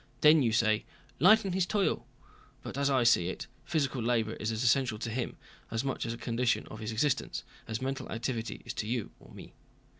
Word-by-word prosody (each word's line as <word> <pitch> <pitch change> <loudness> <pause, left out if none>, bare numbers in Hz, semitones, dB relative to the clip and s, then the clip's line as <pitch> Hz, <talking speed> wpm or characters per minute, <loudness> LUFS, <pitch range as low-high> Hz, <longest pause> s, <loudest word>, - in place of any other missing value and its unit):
Then 155 0 +7
you 120 -4 +2
say, 110 -1 +2 0.4
'lighten 195 - +5
his 185 -1 +1
toil.' 205 -1 0 0.6
But - - -6
as 140 0 +1
I 130 -3 +3
see 115 -7 +4
it, - - -5 0.2
physical 140 -5 0
labor 115 -2 +1
is 110 - -2
as 110 +2 -2
essential 120 -1 +3
to 115 +1 -4
him, 125 +2 -3 0.3
as 115 +2 -1
much 135 -3 -2
a 115 0 -3
condition 120 +1 0
of 110 - -8
his 110 0 -4
existence, 125 +5 0 0.2
as 110 +2 -3
mental 135 0 -3
activity 115 0 -3
is - - -4
to 105 - -3
you 120 -1 -2
or - - -17
me. - - -12
120 Hz, 200 wpm, -30 LUFS, 110-140 Hz, 0.6 s, Then